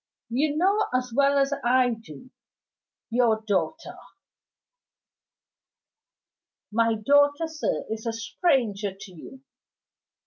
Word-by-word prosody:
"You 290 +5 0
know 395 +5 +2
as 250 -1 -2
well 280 +2 +3
as 275 0 +2
I 250 +1 +3
do 225 - -10 0.8
your 230 -2 +2
daughter." 220 - -2 2.7
"My 230 +1 +2
daughter, 285 +7 +3
sir, 315 -1 -3
is 220 +1 -5
a - - 0
stranger 225 - -1
to 195 -1 -11
you. 220 +10 -13
250 Hz, 100 wpm, -25 LUFS, 220-285 Hz, 2.7 s, well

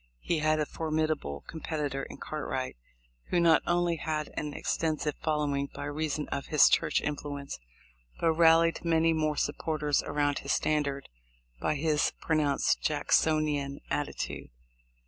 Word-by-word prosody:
He 170 - 0
had 155 0 +2
a 150 - +1
formidable 155 - -2
competi 155 -3 -3
tor 135 - -3
in - - -8
Cartwright, 130 -4 -4 0.5
who 175 - +2
not 165 -2 +5
only 175 -1 +2
had 155 0 -3
an 150 - -3
extensive 155 -1 -1
following 145 -3 0
by - - -5
reason 150 0 -2
of 140 - -3
his 150 -3 +6
church - - +2
influence, 145 -1 -4 0.6
but 165 - +3
rallied 165 0 +4
many 165 -1 +3
more 155 -2 0
supporters 150 -1 0
around 145 -1 0
his - - -1
standard 145 -2 0 0.5
by 150 - 0
his 150 0 +1
pronounced 150 -3 +1
Jacksonian 150 -2 +1
attitude. 145 - -3
150 Hz, 135 wpm, -29 LUFS, 145-160 Hz, 0.6 s, his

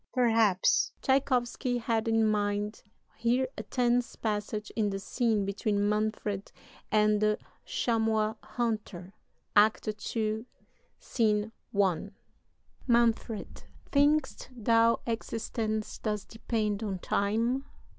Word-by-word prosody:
Perhaps 225 -6 +3
Tschaikowsky 255 -2 +1
had 225 -1 0
in 225 0 +3
mind 210 0 0 0.4
here 245 +3 +2
a - - -4
tense 245 -1 0
passage 210 -1 -3
in 215 -2 +1
the 195 - -2
scene 220 0 0
between 205 +1 0
Manfred 210 -1 -1 0.4
and 210 -1 +3
the 215 0 +3 0.3
Chamois 220 -2 +1
Hunter 210 -6 -3 0.4
(Act 215 +1 +4 0.3
II., 220 +2 -1 0.5
Scene 215 -2 0 0.3
I.): 190 -1 +2 0.8
"MANFRED. 235 -3 +1 0.3
Think'st 290 -1 +2
thou 230 +1 +3
existence 225 -1 -3
doth 210 -2 -3
depend 220 -2 -2
on 200 -4 -2
time? 225 +9 0
220 Hz, 100 wpm, -29 LUFS, 210-235 Hz, 0.8 s, Act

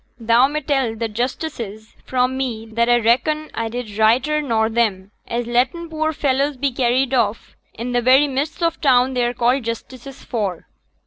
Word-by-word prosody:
Thou 235 +3 +4
may 305 +2 -3
tell 270 -5 0
t' 230 +1 -2
justices 230 -2 -4
fra' 250 -1 +2
me 255 -4 -3
that 230 +2 0
a 240 0 +5
reckon 305 +7 +1
a 230 0 -3
did 225 -3 -6
righter 255 +8 +3
nor 225 -6 +1
them, 215 -4 -1 0.2
as 240 0 -2
letten 255 +8 0
poor 315 0 0
fellys 280 -1 0
be 280 0 +1
carried 255 +1 +1
off 225 -4 -1 0.2
i' 230 - -5
t' 245 0 0
very 260 +4 +5
midst 290 +5 -3
o' 335 - +3
t' 330 - -24
town 260 -2 +3
they're 245 -1 0
called 250 +3 +2
justices 250 +3 -7
for.' 200 -8 -3
245 Hz, 180 wpm, -20 LUFS, 230-275 Hz, 0.2 s, a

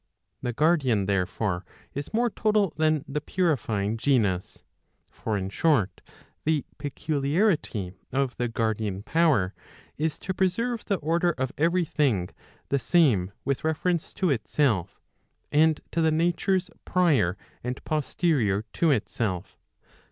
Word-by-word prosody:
The 125 - -1
guardian 135 - +2
therefore 95 -1 -1 0.3
is 140 +1 -5
more 235 +1 +1
total 210 -4 +1
than 155 -2 +1
the 150 +2 -2
purifying 115 - 0
genus. 110 -8 0 0.5
For 110 -2 -2
in 95 0 -3
short, 135 - +1 0.4
the 155 -2 +1
peculiarity 145 - 0 0.2
of 135 -2 0
the 120 - 0
guardian 110 -4 -1
power, 135 - +2 0.5
is 155 0 0
to 190 - -4
preserve 220 +6 0
the 200 - +1
order 170 +1 +1
of 130 -1 -2
every 170 +3 +2
thing 125 - +1 0.4
the 140 - +2
same 125 - +3
with 140 -1 -1
reference 160 +2 0
to 185 -5 +1
itself, 115 - 0 0.5
and 155 +1 +4
to 165 - 0
the 160 - +4
natures 175 +3 +1
prior 140 - +2 0.3
and 125 +1 -4
posterior 145 - +1
to 165 - +2
itself. 105 - -1
145 Hz, 125 wpm, -26 LUFS, 110-165 Hz, 0.5 s, and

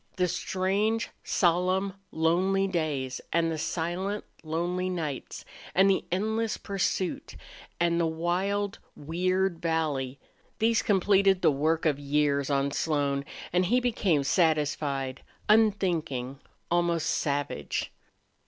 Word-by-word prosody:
The 180 -1 +2
strange, 195 +5 0
solemn, 185 +2 +1 0.2
lonely 185 +5 +2
days 150 -8 -2
and 165 -1 +2
the 160 - -3
silent, 180 +6 -2 0.2
lonely 175 +3 -1
nights, 155 -7 -4 0.3
and 195 +1 +6
the 190 - 0
endless 220 +4 0
pursuit, 190 -2 -2 0.4
and 170 0 +2
the 165 - +2
wild, 185 +5 -1 0.2
weird 180 +3 0
valley 150 -6 -1 0.4
these 225 0 +3
completed 195 -1 +3
the - - +6
work 155 +4 0
of 145 -3 +2
years 140 -1 +1
on 140 0 +1
Slone 140 -2 0 0.3
and 180 +1 +3
he 245 +6 +3
became 205 - +1
satisfied, 145 -4 0 0.3
unthinking, 170 - +2 0.3
almost 170 -2 +1
savage. 140 - -1
170 Hz, 110 wpm, -28 LUFS, 150-190 Hz, 0.4 s, and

